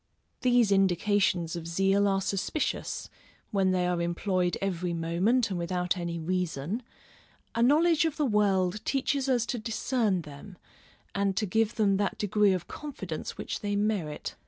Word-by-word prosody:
These 245 -4 +4
indications 190 -2 +2
of 165 -1 -6
zeal 195 +4 +2
are 195 -1 +1
suspicious, 200 +10 -2 0.4
when 195 -2 +2
they 185 -1 +1
are 180 -1 0
employed 180 +1 0
every 180 -3 -2
moment 185 +9 +1
and 180 - -2
without 180 +1 -1
any 170 -2 -3
reason; 180 - -2 0.7
a 230 - 0
knowledge 320 +6 +4
of 315 -2 -1
the 300 - +1
world 205 -3 +1
teaches 275 +1 0
us 245 -3 +2
to 245 0 -3
discern 220 -4 0
them, 150 +6 -11 0.6
and 200 -1 0
to 215 - +1
give 220 +3 +1
them 205 -3 +3
that 200 0 -1
degree 205 -1 +3
of 180 -2 -3
confidence 195 - -6
which - - -4
they 205 -1 -2
merit. 200 -7 -1
195 Hz, 155 wpm, -28 LUFS, 180-220 Hz, 0.7 s, These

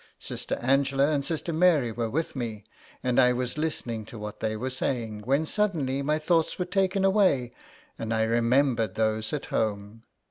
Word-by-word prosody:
Sister - - -3
Angela 135 +2 +3
and 145 -2 0
Sister 165 +2 -2
Mary 155 -8 +3
were 115 0 -2
with 160 +6 -2
me, 115 -5 -4 0.4
and 125 0 +2
I 125 -1 +5
was 125 0 -2
listening 120 -8 -2
to 115 - -10
what 105 0 -7
they 110 -1 -2
were 130 +4 -3
saying, 120 -4 -2
when 140 +5 +2
suddenly 155 -9 0
my 150 +2 +1
thoughts 160 +1 +1
were 180 - -1
taken 190 +1 +1
away 190 - +3 0.5
and 115 0 -4
I 110 -1 +2
remembered 115 -2 +2
those 110 0 0
at 150 - -3
home. 105 +1 -2
130 Hz, 175 wpm, -27 LUFS, 115-155 Hz, 0.5 s, I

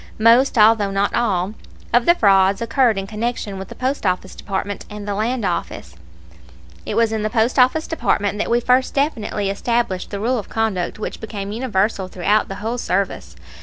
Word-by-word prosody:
Most, 235 +4 +4
although 215 -1 +5
not 195 +1 0
all, 195 -4 0 0.4
of 240 0 +3
the 345 - +6
frauds 195 - +4
occurred 230 -1 +2
in 195 - -2
connection 210 -1 -4
with 190 - -7
the - - -10
Post 265 +2 -2
Office 185 -1 -1
Department 200 +1 -4
and 210 -1 -8
the 205 - -1
Land 225 +2 -1
Office. 175 - -4 0.9
It - - -2
was 230 -1 +3
in 220 -1 -1
the 215 - -1
Post 230 +3 +1
Office 260 +6 +3
Department 205 -10 -1
that - - -1
we 235 - +3
first 250 +2 +2
definitely 215 -8 -1
established 230 -2 -1
the 200 - -5
rule 240 +4 0
of 210 - -9
conduct 215 -6 -1
which 215 - -6
became 205 -3 -5
universal 210 -4 -1
throughout 195 +4 +1
the 195 - -6
whole 240 +2 -2
service. 195 -3 -2
215 Hz, 185 wpm, -20 LUFS, 195-235 Hz, 0.9 s, the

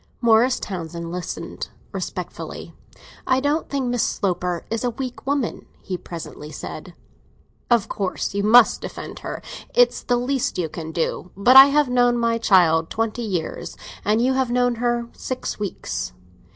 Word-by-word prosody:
Morris 235 +2 +4
Townsend 170 -3 -5
listened 180 0 -5 0.2
respectfully. - - -6 0.5
"I 260 - +3
don't 290 +4 0
think 275 -3 -1
Miss 245 -1 0
Sloper 180 -2 -1
is 225 +1 -1
a 245 - +2
weak 255 +2 -6
woman," 280 -4 -1
he 185 - -5
presently 165 -3 -8
said. - - -8 0.7
"Of 235 -4 +3
course 195 -2 -3
you 200 - 0
must 225 +3 +6
defend - - -7
her—it's - - 0
the 245 - +1
least 255 +1 -1
you 170 -3 -1
can 160 0 -6
do. 170 +2 -2
But 245 +6 +5
I 270 0 +13
have 290 0 +3
known 245 -1 +3
my 230 -1 +1
child 165 -6 +4
twenty 225 +1 -2
years, 185 -8 -4 0.3
and 210 +3 +2
you 255 +3 +2
have 260 -2 +1
known 245 0 +2
her 240 -1 0
six 255 -3 -5
weeks. 205 -2 -4
230 Hz, 150 wpm, -22 LUFS, 180-250 Hz, 0.7 s, I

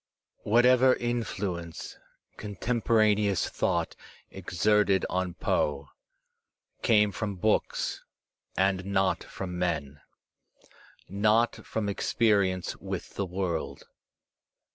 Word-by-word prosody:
Whatever 125 +3 +5
influence 100 -8 -4 0.4
contemporaneous 105 -2 +1
thought - - -1 0.4
exerted 100 +1 +1
on 90 -1 -1
Poe 70 -4 -1 0.9
came 105 -2 +4
from 100 -1 -4
books 105 +4 0 0.5
and 95 -1 +2
not 95 -1 0
from 90 -2 -6
men, 75 -5 -2 1.1
not 110 +4 +1
from 110 -2 -2
experience 100 -3 +1
with - - -6
the 100 - -3
world. 90 -3 -3
100 Hz, 80 wpm, -28 LUFS, 90-110 Hz, 1.1 s, Whatever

